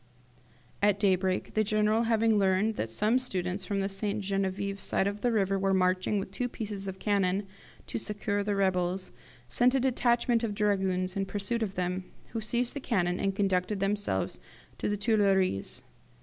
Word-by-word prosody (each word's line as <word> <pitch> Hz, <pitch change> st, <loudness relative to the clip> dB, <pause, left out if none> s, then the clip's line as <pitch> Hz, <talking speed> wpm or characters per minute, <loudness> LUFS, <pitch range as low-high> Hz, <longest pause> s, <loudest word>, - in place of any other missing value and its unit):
"At 205 Hz, -1 st, +3 dB
daybreak, 190 Hz, -2 st, +1 dB
the 215 Hz, -, +2 dB
General 215 Hz, +2 st, +2 dB
having 225 Hz, -1 st, +3 dB
learned 195 Hz, +3 st, +2 dB
that 115 Hz, -, -3 dB
some 215 Hz, -, +2 dB
students 185 Hz, -5 st, -3 dB
from 200 Hz, +1 st, -1 dB
the 195 Hz, -, 0 dB
St. 200 Hz, +1 st, -2 dB
Genevieve 195 Hz, 0 st, -2 dB
side -, -, +1 dB
of 205 Hz, +1 st, -2 dB
the 245 Hz, -, +2 dB
river 195 Hz, -3 st, +1 dB
were 195 Hz, 0 st, +2 dB
marching 185 Hz, +2 st, +2 dB
with 195 Hz, -1 st, -3 dB
two 245 Hz, +5 st, -2 dB
pieces 205 Hz, -4 st, -5 dB
of 190 Hz, 0 st, -5 dB
cannon 195 Hz, -1 st, +1 dB, 0.4 s
to -, -, -4 dB
succour 205 Hz, -1 st, -1 dB
the 205 Hz, 0 st, -1 dB
rebels, 185 Hz, -1 st, 0 dB, 0.4 s
sent 245 Hz, -, +3 dB
a -, -, +4 dB
detachment 240 Hz, -2 st, +2 dB
of 210 Hz, -3 st, -1 dB
dragoons 190 Hz, -3 st, 0 dB
in 195 Hz, -1 st, -1 dB
pursuit 205 Hz, +4 st, -2 dB
of 200 Hz, -3 st, -2 dB
them, 180 Hz, +1 st, -2 dB, 0.2 s
who 225 Hz, -, -4 dB
seized 235 Hz, +3 st, 0 dB
the 285 Hz, -, -4 dB
cannon 185 Hz, -9 st, 0 dB
and 195 Hz, -1 st, 0 dB
conducted 195 Hz, 0 st, 0 dB
them 195 Hz, +1 st, +1 dB
to 205 Hz, 0 st, -2 dB, 0.4 s
the 205 Hz, -, -1 dB
Tuilleries. 195 Hz, -, +1 dB
200 Hz, 175 wpm, -29 LUFS, 190-215 Hz, 0.4 s, a